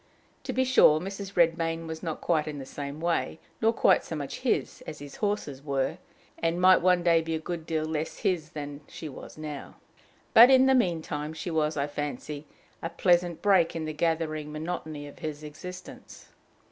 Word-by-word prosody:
To - - -2
be 260 - +2
sure, 250 -12 +6
Mrs. 195 +2 -6
Redmain 165 -1 +2
was 160 0 -6
not 160 -3 -4
quite 155 -3 +1
in 150 -1 -4
the 135 - -6
same 140 +2 -6
way, 170 -1 -1 0.2
nor 225 0 +4
quite 235 - +4
so 165 - -5
much 145 -2 -5
his, 255 0 -1
as 150 - -6
his 145 -1 -10
horses 205 -10 -2
were, 140 +3 -1 0.4
and 165 +1 0
might 185 +1 +6
one 180 0 +3
day 170 -1 +4
be 160 0 -2
a - - -2
good 165 0 -5
deal 155 -1 0
less 155 0 -3
his 180 -7 0
than 145 -2 -7
she 160 - -8
was 145 - -10
now; 150 -2 -7 0.6
but 235 +3 +10
in 260 0 +7
the 265 - +5
mean 175 -11 +2
time 150 0 -4
she 160 +2 -5
was, 155 -1 0
I 140 - +1
fancy, 145 0 -5 0.3
a 165 - -3
pleasant 175 -2 +2
break 190 -6 +4
in 160 -1 -3
the 155 - -4
gathering 155 -1 -1
monotony 155 -2 -5
of 145 - -13
his 155 -1 -5
existence. 180 +5 -10
160 Hz, 195 wpm, -28 LUFS, 150-180 Hz, 0.6 s, but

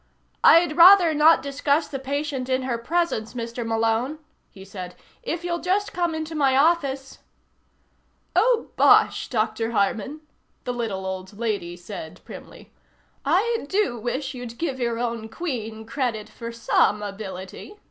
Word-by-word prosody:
"I'd 335 -2 +6
rather 355 -1 +8
not 310 +1 +5
discuss 285 +2 0
the 275 - -5
patient 275 -1 -3
in 260 0 +1
her 240 -3 -2
presence, 270 -5 -1
Mr. 235 0 -4
Malone," 225 +5 0 0.3
he 190 -2 -13
said. 185 -2 -8 0.3
"If 345 -8 -4
you'll 345 -1 -2
just 385 +4 -1
come 345 -2 -1
into 315 0 -5
my 275 -4 +2
office 275 -3 +1 0.6
" - - -43
"Oh, 475 -1 +2
bosh, - - +4
Dr. 225 -1 -1
Harman," 225 +8 -1 0.4
the 250 - -3
little 215 -6 -3
old 190 +1 -6
lady 200 -7 -3
said 170 -2 -9
primly. - - -12 0.5
"I 390 +4 +1
do 385 - +1
wish 265 +5 -3
you'd 245 -2 -8
give 275 -4 -3
your 235 -2 -1
own 230 -2 -3
Queen 225 -8 -5
credit 225 -4 -3
for 230 +1 -8
some 220 -2 +1
ability. 195 - -8
255 Hz, 145 wpm, -24 LUFS, 220-315 Hz, 0.6 s, rather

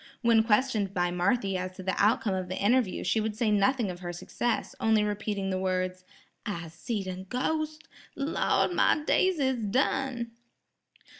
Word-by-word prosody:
When 230 -1 +5
questioned 215 -3 +1
by 175 -1 +1
Marthy 195 +2 +1
as 185 0 -4
to 185 0 -9
the 190 0 0
outcome 210 -1 +2
of 185 -1 -3
the 185 - -3
interview 230 0 +2
she 220 - +1
would 215 0 -2
say 220 -1 +1
nothing 210 +1 +2
of 175 - -9
her 175 -1 -5
success, 225 +7 -2
only 220 -1 +3
repeating 205 -2 -2
the 185 - -1
words. 185 0 -2 0.4
"I'se 170 -7 -5
seed 205 +3 -3
a 185 -1 -4
ghos'! 305 +10 -2 0.4
Lawd, 290 +4 +1
my 305 -3 +3
days 375 +1 +3
is 265 -4 0
done." 240 +2 0
210 Hz, 165 wpm, -28 LUFS, 185-245 Hz, 0.4 s, When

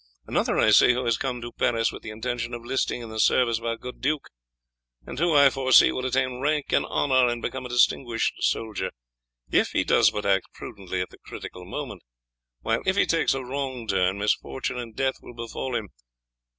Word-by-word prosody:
Another - - 0
I 110 - +4
see 115 +4 +7
who 125 +1 -2
has 115 -1 +2
come 125 -1 -3
to 120 0 -6
Paris 115 -1 +1
with - - -9
the - - -8
intention 120 +2 -4
of 120 - -9
enlisting 120 -1 -1
in 115 - -8
the 110 - -5
service 115 0 +3
of 115 - -10
our 115 0 -1
good 125 +1 -9
duke, 150 +2 -1 0.8
and - - -7
who, 170 -1 +2
I 140 -1 +7
foresee, 130 -1 +5
will 130 0 -2
attain 130 -1 0
rank 150 +1 -1
and - - +2
honour 130 -3 +2
and 120 0 -1
become 130 +2 -4
a - - -14
distinguished 120 -1 +2
soldier 105 -4 -1 0.6
if - - +2
he - - +2
does - - +4
but 105 - -5
act 95 -1 +2
prudently 95 -2 -5
at 90 - -5
the - - -16
critical 90 0 -9
moment, - - -6 0.6
while 115 +1 0
if 190 - +1
he - - +3
takes 165 -4 +1
a 135 - -4
wrong 130 -2 -4
turn 95 -1 +1
misfortune 125 +4 -2
and 115 -3 -8
death 130 -1 0
will 120 - -12
befall 120 +2 -5
him. 105 -4 -3
120 Hz, 205 wpm, -25 LUFS, 115-130 Hz, 0.8 s, see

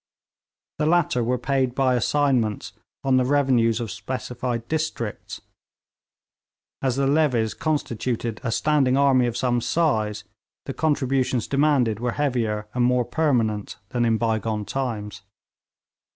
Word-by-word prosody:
The 150 - +1
latter 160 -7 +2
were 125 +2 0
paid 130 0 0
by 130 -2 +2
assignments 125 -4 0 0.3
on 135 -1 +3
the 130 - +3
revenues 125 -5 +2
of 115 -3 -4
specified 120 +2 -4
districts; 150 -9 -4 1.4
as 130 -2 0
the 140 0 +1
levies 135 -6 +2
constituted 120 -6 -2
a 115 - -1
standing 135 0 +2
army 135 -3 +4
of 120 - -3
some 120 -1 +1
size, 110 -10 0 0.4
the - - -4
contributions 130 -5 0
demanded 135 -7 +2
were 120 0 -1
heavier 115 -7 -1
and 125 - +1
more 125 0 +2
permanent 115 -11 0
than 120 -1 0
in 115 -1 +2
bygone 110 -2 -1
times. 110 -6 -4
125 Hz, 125 wpm, -24 LUFS, 115-140 Hz, 1.4 s, army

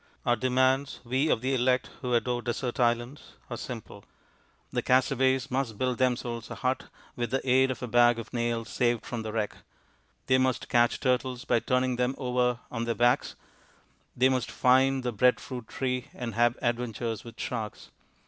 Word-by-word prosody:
Our 120 - +3
demands 130 +3 +1
we 130 +5 0
of 110 - +2
the 130 +2 0
elect 125 0 +1
who 125 -2 0
adore 120 +1 0
desert 120 +2 -3
islands 120 +3 0 0.2
are - - -2
simple. - - -8 0.7
The - - 0
castaways 130 0 +2
must 130 -5 -1
build 125 0 -1
themselves 120 -2 -1
a - - -6
hut 130 0 -1 0.3
with 120 -1 -2
the 135 +2 -2
aid 130 +1 +4
of 130 - -4
a - - -2
bag 120 0 +5
of 115 - -8
nails 115 -1 -1
saved 120 -2 0
from 120 -2 -4
the 110 -1 -5
wreck; 105 -1 -2 0.7
they 130 0 +3
must 130 -1 0
catch 120 -1 +3
turtles 125 -1 0
by - - +3
turning 125 +1 0
them 125 +2 0
over 125 -2 0
on 115 -1 -2
their 115 -1 -1
backs; 120 +3 +2 0.8
they 130 +1 +5
must 130 -2 0
find 130 +1 +3
the 125 - -1
bread 125 +3 +3
fruit 125 -4 -7
tree 125 -2 -2
and 120 -2 -5
have 120 +2 +2
adventures 115 -2 -2
with 115 -1 -12
sharks. 110 -4 -5
125 Hz, 175 wpm, -28 LUFS, 120-130 Hz, 0.8 s, bag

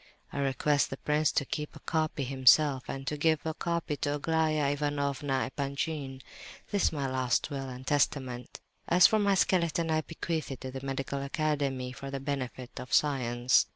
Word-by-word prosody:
I 140 - -3
request 140 +1 +2
the 135 - -5
prince 150 +1 +1
to 140 - +1
keep 150 +2 -4
a - - -10
copy 155 -3 -1
himself, 135 +1 +4
and 135 0 -5
to 150 - -2
give 155 0 +2
a 160 - -1
copy 170 -2 -2
to 145 +1 -1
Aglaya 155 -1 +1
Ivanovna 140 -2 -1
Epanchin. 140 -1 -3 0.5
This 205 -3 +2
is - - +3
my 140 -4 -2
last 130 +3 0
will 135 -1 -4
and 130 +1 -8
testament. 130 -4 -1 0.3
As 175 0 +6
for 220 - +5
my 200 -1 +3
skeleton, 170 -3 +2
I 155 0 +2
bequeath 165 0 -3
it 135 -3 -6
to 130 -1 -5
the 135 0 -7
Medical 135 0 -3
Academy 140 -3 -1
for 135 +2 -7
the 135 0 -4
benefit 130 -2 -4
of 125 - -8
science. 125 -4 +3
140 Hz, 180 wpm, -30 LUFS, 135-155 Hz, 0.5 s, As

